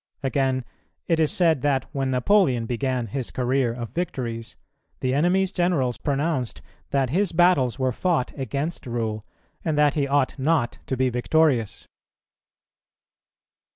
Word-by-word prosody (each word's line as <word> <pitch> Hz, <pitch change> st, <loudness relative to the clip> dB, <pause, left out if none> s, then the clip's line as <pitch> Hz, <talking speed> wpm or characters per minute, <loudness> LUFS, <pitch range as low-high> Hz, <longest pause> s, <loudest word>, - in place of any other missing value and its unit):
Again, 130 Hz, -2 st, 0 dB, 0.4 s
it 165 Hz, -2 st, +2 dB
is 155 Hz, -2 st, +3 dB
said 165 Hz, -6 st, +2 dB
that 140 Hz, -2 st, +1 dB
when 135 Hz, -1 st, -1 dB
Napoleon 130 Hz, -, +3 dB
began 125 Hz, +1 st, -1 dB
his 120 Hz, +3 st, -4 dB
career 130 Hz, -1 st, 0 dB
of 115 Hz, -2 st, -6 dB
victories, 120 Hz, -8 st, -4 dB, 0.4 s
the 130 Hz, 0 st, 0 dB
enemy's 180 Hz, +6 st, +2 dB
generals 175 Hz, -10 st, 0 dB
pronounced 140 Hz, -3 st, -1 dB, 0.3 s
that 135 Hz, -3 st, 0 dB
his 190 Hz, +3 st, +1 dB
battles 165 Hz, -8 st, +3 dB
were 130 Hz, -1 st, +1 dB
fought 160 Hz, 0 st, 0 dB
against 140 Hz, +3 st, -3 dB
rule, 110 Hz, -3 st, -2 dB, 0.4 s
and 155 Hz, -3 st, -1 dB
that 150 Hz, -1 st, +4 dB
he 145 Hz, -2 st, 0 dB
ought 140 Hz, 0 st, +1 dB
not 130 Hz, -3 st, +1 dB
to 130 Hz, -, -2 dB
be 130 Hz, 0 st, +2 dB
victorious. 125 Hz, -2 st, +1 dB
135 Hz, 135 wpm, -24 LUFS, 125-160 Hz, 0.4 s, that